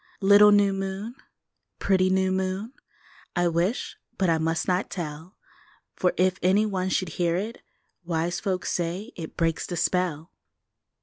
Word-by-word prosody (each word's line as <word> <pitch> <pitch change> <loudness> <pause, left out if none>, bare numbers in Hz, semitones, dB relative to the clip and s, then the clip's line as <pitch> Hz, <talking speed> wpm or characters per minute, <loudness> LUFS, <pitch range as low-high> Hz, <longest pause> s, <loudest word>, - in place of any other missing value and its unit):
Little 205 +1 +7
new 205 -1 +4
moon, 195 +4 -4 0.6
pretty 185 -1 +2
new 190 0 +2
moon, 190 +5 -2 0.6
I 175 -1 +2
wish 175 +8 -1 0.2
but 185 -3 +2
I 160 - +2
must 165 +1 -1
not 185 +1 0
tell! 160 +1 -7 0.6
For 180 - +2
if 185 +1 +2
any 195 +4 +3
one 190 -3 -1
should 185 -1 0
hear 170 -1 +2
it, 215 +6 -4 0.4
Wise 170 +1 -1
folks 190 -2 -2
say 180 +7 -3
it 160 -2 -8
breaks 165 -1 0
the 175 - -4
spell! 175 -2 -1
185 Hz, 145 wpm, -26 LUFS, 170-195 Hz, 0.6 s, Little